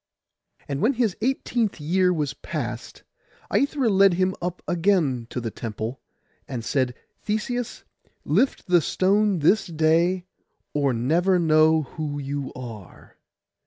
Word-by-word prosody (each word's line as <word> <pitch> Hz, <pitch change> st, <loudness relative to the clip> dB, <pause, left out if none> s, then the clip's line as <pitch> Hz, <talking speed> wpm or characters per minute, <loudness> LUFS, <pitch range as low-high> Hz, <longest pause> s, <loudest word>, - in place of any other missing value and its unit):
And 140 Hz, 0 st, -3 dB
when 245 Hz, +6 st, +3 dB
his 230 Hz, -6 st, 0 dB
eighteenth 235 Hz, -4 st, 0 dB
year 180 Hz, +5 st, +2 dB
was 150 Hz, -5 st, -1 dB
past, -, -, -6 dB, 0.5 s
Aithra 280 Hz, -2 st, +1 dB
led 195 Hz, -3 st, +5 dB
him 185 Hz, +1 st, +1 dB
up 180 Hz, +1 st, -4 dB
again 165 Hz, -, +1 dB
to -, -, -4 dB
the 115 Hz, -2 st, -4 dB
temple, 115 Hz, +3 st, -5 dB, 0.5 s
and 120 Hz, -4 st, -5 dB
said, 125 Hz, 0 st, 0 dB, 0.3 s
'Theseus, 235 Hz, +3 st, -3 dB, 0.4 s
lift 265 Hz, -, +1 dB
the 175 Hz, -2 st, +4 dB
stone 200 Hz, +5 st, +2 dB
this 180 Hz, +8 st, +3 dB
day, 170 Hz, +3 st, +2 dB, 0.5 s
or 140 Hz, -2 st, +2 dB
never 165 Hz, +11 st, +2 dB
know 160 Hz, -1 st, +4 dB
who 145 Hz, +1 st, -5 dB
you 140 Hz, -1 st, -4 dB
are. 115 Hz, -7 st, -10 dB
165 Hz, 125 wpm, -24 LUFS, 140-195 Hz, 0.5 s, led